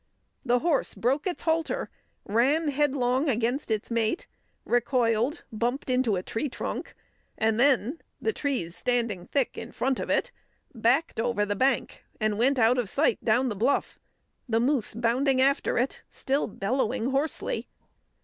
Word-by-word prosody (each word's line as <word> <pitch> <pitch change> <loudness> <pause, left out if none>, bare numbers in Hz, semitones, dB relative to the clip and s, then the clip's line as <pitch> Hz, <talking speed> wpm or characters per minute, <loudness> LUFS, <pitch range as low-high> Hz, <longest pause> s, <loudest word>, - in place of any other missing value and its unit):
The 245 -1 +3
horse 305 +2 0
broke 275 +8 0
its 360 - -4
halter, 325 -1 0 0.3
ran 275 +9 +2
headlong 275 -1 +1
against 245 +3 0
its 220 +1 -2
mate, 230 +7 0 0.4
recoiled, 240 +3 +1
bumped 240 +4 -1
into 250 -5 +2
a 180 - -3
tree 250 +9 -2
trunk, - - -5 0.4
and 220 0 +1
then 270 +2 +3 0.2
the 445 - 0
trees 250 - -2
standing 235 -7 -1
thick 275 -4 -1
in - - -8
front 265 0 -1
of - - -4
it - - +1 0.4
backed 240 +4 +1
over 225 -3 +1
the 205 0 -2
bank 260 +4 0 0.2
and 215 -1 0
went 265 +3 +3
out 245 +1 +4
of 225 -5 -2
sight 280 -3 +1
down 245 +4 +2
the 210 - -3
bluff, 230 +8 0 0.5
the 225 0 +2
moose 250 -3 0
bounding 255 +3 +2
after 275 +2 +2
it, 250 +3 -1
still 275 +2 -1
bellowing 240 +4 -1
hoarsely. 280 +3 -1
250 Hz, 150 wpm, -27 LUFS, 225-275 Hz, 0.5 s, out